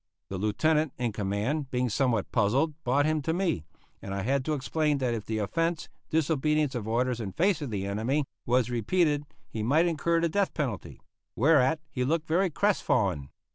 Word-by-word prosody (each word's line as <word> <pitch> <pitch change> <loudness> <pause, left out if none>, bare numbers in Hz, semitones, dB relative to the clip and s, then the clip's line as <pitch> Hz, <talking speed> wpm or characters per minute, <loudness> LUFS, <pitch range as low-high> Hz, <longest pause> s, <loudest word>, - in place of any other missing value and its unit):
The 95 - -4
Lieutenant 150 +8 +1
in 120 -2 -1
command, 110 +8 -2
being 125 0 0
somewhat 115 -2 0
puzzled, 130 +8 +2
brought 140 +4 +2
him 155 0 +1
to 160 +4 -1
me, 170 - -1 0.4
and 95 0 -5
I 100 - -2
had 135 +4 +1
to 155 - 0
explain 150 +2 0
that 125 -3 0
if 110 -3 -5
the 110 - -1
offence, 165 - -1 0.2
disobedience 155 -2 +1
of 115 -4 -4
orders 120 +2 0
in 95 -4 -5
face 185 -1 +2
of 145 - -3
the 100 -3 -3
enemy, 115 +9 0 0.2
was 125 0 +2
repeated 145 - +1 0.2
he 110 - -5
might 145 +10 +3
incur 170 0 +1
the 170 - +2
death 200 +4 0
penalty; 125 - -4 0.3
whereat 150 +3 +3
he 125 -2 -1
looked 160 +4 0
very 180 +4 +2
crestfallen. 100 - +1
135 Hz, 180 wpm, -28 LUFS, 110-160 Hz, 0.4 s, might